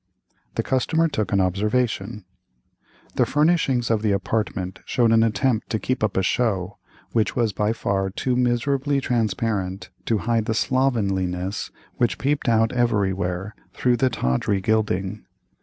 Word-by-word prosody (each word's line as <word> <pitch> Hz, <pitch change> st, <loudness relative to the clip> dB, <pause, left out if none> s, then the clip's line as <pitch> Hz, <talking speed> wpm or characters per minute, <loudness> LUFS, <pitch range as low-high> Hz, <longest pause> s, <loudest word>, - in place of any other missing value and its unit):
The -, -, 0 dB
customer 160 Hz, +5 st, +1 dB
took 120 Hz, -, -2 dB
an 100 Hz, -, +3 dB
observation: 105 Hz, +2 st, 0 dB, 0.9 s
The -, -, +4 dB
furnishings 145 Hz, -6 st, +2 dB
of 110 Hz, -2 st, +2 dB
the 105 Hz, -2 st, +2 dB
apartment 95 Hz, -2 st, -2 dB
showed 120 Hz, -3 st, +2 dB
an 115 Hz, 0 st, +5 dB
attempt 115 Hz, +1 st, +1 dB
to 110 Hz, -, 0 dB
keep 130 Hz, 0 st, -2 dB
up 110 Hz, -, 0 dB
a 95 Hz, -, +2 dB
show, 100 Hz, -4 st, 0 dB, 0.3 s
which 110 Hz, -2 st, +1 dB
was 115 Hz, -4 st, +1 dB
by 105 Hz, +1 st, 0 dB
far 100 Hz, -4 st, -1 dB
too 125 Hz, +6 st, -1 dB
miserably 130 Hz, +3 st, +1 dB
transparent 105 Hz, -6 st, -1 dB
to 115 Hz, -, +1 dB
hide 115 Hz, -2 st, +1 dB
the 110 Hz, -, -1 dB
slovenliness 100 Hz, -8 st, 0 dB, 0.3 s
which 120 Hz, -2 st, +1 dB
peeped 140 Hz, -1 st, 0 dB
out 115 Hz, 0 st, +3 dB
everywhere 100 Hz, -5 st, 0 dB, 0.2 s
through 125 Hz, -1 st, +2 dB
the 130 Hz, 0 st, +2 dB
tawdry 100 Hz, -, 0 dB
gilding. 105 Hz, -1 st, 0 dB
110 Hz, 140 wpm, -23 LUFS, 95-125 Hz, 0.9 s, an